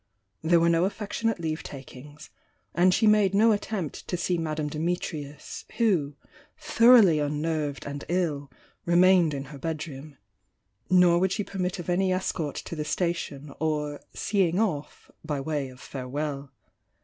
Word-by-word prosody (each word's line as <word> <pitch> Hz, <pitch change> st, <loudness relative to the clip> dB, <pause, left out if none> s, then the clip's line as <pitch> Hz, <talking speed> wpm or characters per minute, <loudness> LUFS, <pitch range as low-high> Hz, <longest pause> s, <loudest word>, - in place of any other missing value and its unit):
There 170 Hz, +2 st, +4 dB
were 165 Hz, -, +3 dB
no 170 Hz, +1 st, +3 dB
affectionate 210 Hz, +2 st, -2 dB
leave 160 Hz, -2 st, -3 dB
takings, 145 Hz, +2 st, -11 dB, 0.2 s
— -, -, -44 dB
and 180 Hz, +2 st, +4 dB
she 220 Hz, +5 st, +2 dB
made 210 Hz, -2 st, +4 dB
no 225 Hz, +3 st, +5 dB
attempt 205 Hz, -6 st, -3 dB
to 180 Hz, -, -2 dB
see 180 Hz, +1 st, 0 dB
Madame 155 Hz, -2 st, -2 dB
Dimitrius, 150 Hz, -2 st, -4 dB
who, 175 Hz, -, +1 dB, 0.4 s
thoroughly 235 Hz, -, +6 dB
unnerved 150 Hz, 0 st, -2 dB
and 145 Hz, 0 st, -5 dB
ill, 155 Hz, -6 st, -1 dB, 0.3 s
re 170 Hz, -, 0 dB
mained 180 Hz, -4 st, +5 dB
in 135 Hz, -, -4 dB
her 140 Hz, -, -9 dB
bedroom, 155 Hz, -2 st, -6 dB, 0.4 s
— -, -, -52 dB, 0.2 s
nor 180 Hz, -2 st, +5 dB
would 190 Hz, 0 st, +1 dB
she 205 Hz, +2 st, -1 dB
permit 185 Hz, -2 st, -3 dB
of 175 Hz, -, -7 dB
any 185 Hz, +1 st, +1 dB
escort 175 Hz, -5 st, -2 dB
to -, -, -6 dB
the 155 Hz, -, -3 dB
station, 150 Hz, -4 st, -3 dB
or 150 Hz, -2 st, -2 dB
"seeing 185 Hz, -4 st, 0 dB
off" 170 Hz, -10 st, -3 dB
by 145 Hz, -2 st, -2 dB
way 140 Hz, -1 st, -2 dB
of 125 Hz, 0 st, -14 dB
farewell. 140 Hz, +1 st, -5 dB
165 Hz, 155 wpm, -27 LUFS, 145-185 Hz, 0.4 s, thoroughly